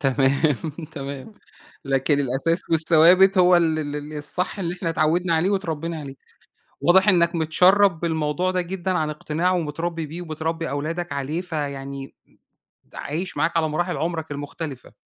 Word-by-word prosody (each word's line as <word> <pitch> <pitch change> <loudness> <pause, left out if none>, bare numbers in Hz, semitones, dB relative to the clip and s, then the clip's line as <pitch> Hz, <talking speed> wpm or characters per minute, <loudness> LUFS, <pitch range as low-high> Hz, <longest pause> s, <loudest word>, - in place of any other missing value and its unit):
تمام، 140 +2 +2 0.4
تمام، 140 +6 -7 0.5
لكن 135 +1 +1
الأساس 140 +6 0
والثوابت 170 +4 +5
هو 180 0 +6
ال 160 -2 +2
ال 145 -1 -3
ال 150 +1 -7
الصح 180 +7 -2
اللي 175 -2 -2
إحنا 175 -2 -3
اتعوّدنا 165 +2 +1
عليه 170 +4 +2
واتربّينا 165 -4 -2
عليه، 140 -2 -8 0.7
واضح 190 +3 +5
إنّك 170 -2 +3
متشّرب 180 +3 +4
بالموضوع 160 +1 -1
ده 185 0 0
جدًا 185 +1 -3
عن 160 -4 0
اقتناع 155 +4 -1
ومتربّي 165 -1 -2
بيه، 160 +4 -8
وبتربّي 165 0 -3
أولادك 165 +5 -3
عليه، 140 +4 -3
فيعني 140 -5 -5
م - - -32 0.6
عايش 165 +4 -5
معاك 160 +3 +1
على 160 -1 +2
مراحل 175 +4 -1
عمُرك 160 -2 -3
المختلفة. 145 -1 -7
160 Hz, 145 wpm, -23 LUFS, 145-175 Hz, 0.7 s, هو